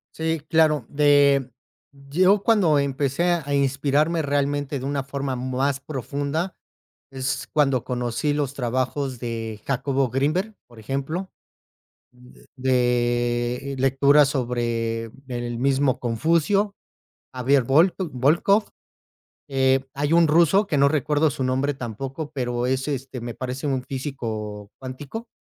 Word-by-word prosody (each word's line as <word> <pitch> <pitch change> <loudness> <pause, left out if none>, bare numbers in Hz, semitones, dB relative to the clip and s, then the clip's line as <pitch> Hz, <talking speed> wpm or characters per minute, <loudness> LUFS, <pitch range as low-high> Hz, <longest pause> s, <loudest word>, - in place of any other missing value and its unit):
Sí, 160 -1 -1
claro. 155 -5 +3
De 140 -2 +4 0.4
yo 175 +9 +2
cuando 195 -10 +4
empecé 140 +2 0 0.2
a 145 +1 -3
inspirarme 140 +4 +1
realmente 145 -1 -1
de 130 - -6
una 140 0 -1
forma 140 -1 -3
más 130 +2 -1
profunda, 145 +5 -3 0.6
es 135 +1 -3
cuando 135 -5 +2
conocí 125 +3 -1
los 145 -2 -1
trabajos 130 +1 -2
de 115 -2 -5
Jacobo 135 0 0
Grinberg, 155 - 0
por 120 -2 -15
ejemplo, 140 - -4 0.8
de, 125 0 -1
eh, - - -5
lectura 140 +3 +4
sobre 115 -4 -2 0.2
el 120 -2 -4
mismo 135 0 +2
Confucio, 165 - +1 0.6
Javier 130 +1 +2
Wol 160 +9 +4
Wolcoff, 170 - +2 0.8
eh, 135 0 +2
hay 145 +2 -1
un 170 -1 +5
ruso 170 +6 +4
que 150 - 0
no 140 0 +5
recuerdo 150 +1 +2
su 130 - -3
nombre 130 +3 0
tampoco, 135 +5 -6
pero 125 -3 -2
es 130 +2 -1
este, 135 -2 -4
me 120 0 -5
parece 130 +3 -5
un 135 -2 0
físico 110 -7 -5
cuántico, 140 - -7
135 Hz, 125 wpm, -23 LUFS, 125-150 Hz, 0.8 s, un